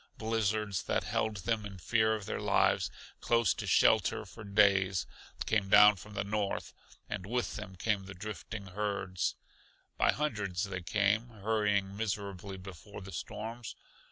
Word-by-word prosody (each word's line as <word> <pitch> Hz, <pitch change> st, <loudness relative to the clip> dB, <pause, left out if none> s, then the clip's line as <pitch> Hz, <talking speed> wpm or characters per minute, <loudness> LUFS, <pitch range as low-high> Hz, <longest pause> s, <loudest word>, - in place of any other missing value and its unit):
Blizzards 110 Hz, -3 st, 0 dB
that -, -, 0 dB
held 110 Hz, -1 st, -1 dB
them, 115 Hz, -2 st, +1 dB
in 100 Hz, -2 st, -7 dB
fear 110 Hz, +4 st, +2 dB
of 105 Hz, -3 st, -6 dB
their -, -, -3 dB
lives, -, -, +3 dB, 0.3 s
close 115 Hz, -5 st, +3 dB
to -, -, -5 dB
shelter -, -, +4 dB
for 115 Hz, -, -11 dB
days, 100 Hz, -3 st, +3 dB, 0.4 s
came 105 Hz, -3 st, +1 dB
down 105 Hz, +1 st, +8 dB
from 105 Hz, +2 st, -11 dB
the 100 Hz, -, 0 dB
north; 100 Hz, 0 st, -2 dB, 0.3 s
and 100 Hz, -3 st, -4 dB
with 120 Hz, +4 st, -2 dB
them 100 Hz, -2 st, -7 dB
came 100 Hz, +1 st, -1 dB
the 95 Hz, -, -8 dB
drifting 105 Hz, +1 st, -6 dB
herds. 100 Hz, -2 st, -2 dB, 0.6 s
By -, -, +5 dB
hundreds 105 Hz, -11 st, -1 dB
they 95 Hz, -2 st, -3 dB
came, 105 Hz, +5 st, +1 dB
hurrying 105 Hz, -3 st, 0 dB
miserably 100 Hz, -3 st, -3 dB
before 95 Hz, +2 st, -10 dB
the 95 Hz, 0 st, -9 dB
storms. 110 Hz, +6 st, -6 dB
105 Hz, 150 wpm, -32 LUFS, 95-110 Hz, 0.6 s, down